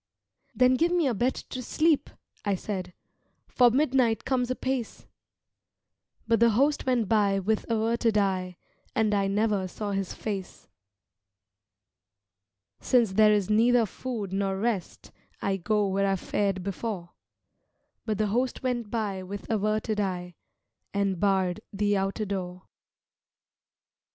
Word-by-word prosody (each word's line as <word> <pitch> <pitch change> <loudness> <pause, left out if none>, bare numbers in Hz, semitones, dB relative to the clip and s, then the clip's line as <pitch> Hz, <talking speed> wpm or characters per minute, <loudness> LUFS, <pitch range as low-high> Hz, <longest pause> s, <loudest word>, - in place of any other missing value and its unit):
"Then 250 +2 +5
give 335 +4 +2
me 350 -3 +2
a 260 - +2
bed 245 +5 0
to 255 - -7
sleep," 310 +4 +1 0.3
I 200 -2 +1
said, 185 -2 -5 0.5
"For 245 -1 +5
midnight 255 -3 +2
comes 255 -2 0
apace" 255 -2 -3 1.2
But 230 0 +3
the 235 0 +6
Host 275 +6 +1
went 240 -5 +2
by 205 -2 +3
with 210 +4 -1
averted 230 0 +1
eye 185 -3 0 0.4
And 215 -1 +2
I 200 -1 +2
never 205 -1 +1
saw 205 +2 -5
his 195 -2 -3
face. 195 -4 -6 2.1
"Since 235 -5 +3
there 215 +2 +5
is 205 -1 +1
neither 235 +2 +4
food 215 -2 -5
nor 195 0 0
rest, 210 -4 -3 0.3
I 195 -1 -1
go 210 +3 +1
where 195 0 +1
I 195 - +2
fared 195 0 -1
before" 195 -2 -4 0.9
But 215 -3 -2
the 215 - +1
Host 250 +3 -1
went 240 -4 -1
by 205 -4 -2
with 195 +2 -7
averted 215 0 0
eye 180 -3 -2 0.6
And 195 -3 0
barred 190 0 +1
the 205 0 +1
outer 195 +2 -1
door. 185 -2 -4
210 Hz, 130 wpm, -27 LUFS, 195-235 Hz, 2.1 s, the